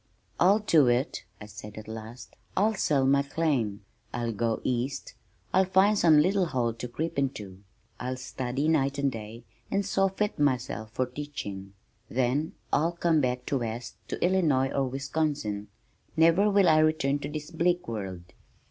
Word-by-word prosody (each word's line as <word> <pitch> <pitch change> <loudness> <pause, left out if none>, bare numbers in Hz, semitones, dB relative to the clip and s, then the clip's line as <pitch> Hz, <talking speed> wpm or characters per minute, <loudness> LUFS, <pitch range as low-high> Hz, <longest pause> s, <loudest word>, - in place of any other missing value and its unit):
"I'll 190 +4 +6
do 165 - +4
it," 120 +4 0
I 105 - -8
said 105 0 -10
at 110 - -8
last. 110 +2 -9 0.2
"I'll 215 +3 +3
sell 145 -9 +1
my 140 +1 +4
claim. 135 -9 -1 0.3
I'll 120 -1 -2
go 115 +1 0
east. 130 +2 -2 0.4
I'll 190 - +5
find 190 +3 +4
some 165 -6 +5
little 185 +4 +3
hole 120 -6 0
to 115 +2 -6
creep 155 +5 -3
into. 105 -9 -3 0.4
I'll 130 +1 -3
study 130 +2 -3
night 140 -3 +2
and 140 -1 +1
day 110 0 -8 0.3
and 200 0 0
so 195 0 +2
fit 205 0 -2
myself 125 -5 0
for 130 +3 -1
teaching, 120 -8 -7 0.4
then 130 +5 0 0.2
I'll 165 +4 +2
come 170 -2 +2
back 125 -1 -1
west 120 -3 -3
to - - -1
Illinois 155 -8 +2
or 135 -1 0
Wisconsin. 135 -6 -2 0.5
Never 165 +6 +5
will 200 -2 +4
I 155 -1 +6
return 155 -3 +2
to 145 - -5
this 150 +1 -6
bleak 175 +2 +1
world." 95 -6 -5
140 Hz, 160 wpm, -28 LUFS, 120-160 Hz, 0.5 s, I'll